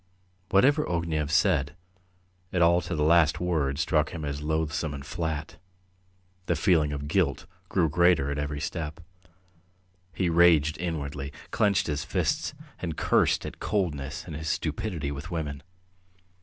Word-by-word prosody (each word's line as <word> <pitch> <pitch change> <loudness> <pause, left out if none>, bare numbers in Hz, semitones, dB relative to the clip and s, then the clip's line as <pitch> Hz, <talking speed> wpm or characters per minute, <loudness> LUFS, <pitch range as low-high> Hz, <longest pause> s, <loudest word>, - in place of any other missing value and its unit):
Whatever 140 +10 +4
Ognev 80 -4 -1
said, 80 -4 +2 0.8
it 90 -2 +2
all 85 +1 +4
to 85 +1 -4
the 75 - 0
last 80 -1 +4
word 80 -6 0
struck 75 +1 +1
him 80 -3 -6
as 70 0 -4
loathsome 80 0 -1
and 70 0 -8
flat. 80 -2 -4 0.9
The 85 - +2
feeling 80 -2 +3
of 70 0 -4
guilt - - +1 0.2
grew 90 -4 +2
greater 85 -3 +3
at 70 - -2
every 70 0 -3
step. 80 -1 -4 1.1
He 90 +2 -1
raged 80 -3 +4
inwardly, 75 -5 -4 0.2
clenched 100 -3 +2
his 75 -2 -2
fists, - - -1 0.2
and 85 -3 -4
cursed - - +2
his - - -5
coldness 75 -9 -2
and 80 - -7
his 80 0 -4
stupidity 80 -8 -2
with 70 +1 -6
women. 75 -5 -4
80 Hz, 140 wpm, -27 LUFS, 75-85 Hz, 1.1 s, Whatever